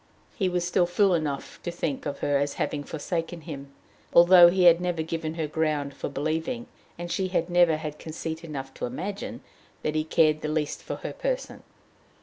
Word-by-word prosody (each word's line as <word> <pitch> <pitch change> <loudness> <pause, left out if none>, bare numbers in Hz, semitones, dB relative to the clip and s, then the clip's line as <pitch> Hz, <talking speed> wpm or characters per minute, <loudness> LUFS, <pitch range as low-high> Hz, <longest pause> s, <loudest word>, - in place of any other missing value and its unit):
He 190 -4 +1
was 180 -1 -1
still 180 -1 +2
fool 190 +2 +3
enough 150 -5 -3
to - - -4
think 155 -5 -3
of 140 -1 -5
her 145 -1 +2
as 145 0 -1
having 145 -1 -2
forsaken 165 +2 -4
him, 140 -4 -8 0.4
although 175 0 +9
he 185 +1 +2
had 170 0 +7
never 175 -3 -1
given 160 0 -4
her 160 -2 -1
ground 150 -2 -1
for 135 - -5
believing, 160 - -2 0.3
and 175 0 -5
she 190 -1 0
had 180 -1 -1
never 175 -3 +5
had 155 -1 -6
conceit 160 0 -5
enough 135 -4 -6
to - - -4
imagine, 200 - -5 0.4
that 150 - 0
he 155 0 +1
cared 155 -1 +3
the - - -2
least 150 -1 -2
for - - -5
her - - -3
person. - - -3
160 Hz, 190 wpm, -26 LUFS, 150-175 Hz, 0.4 s, although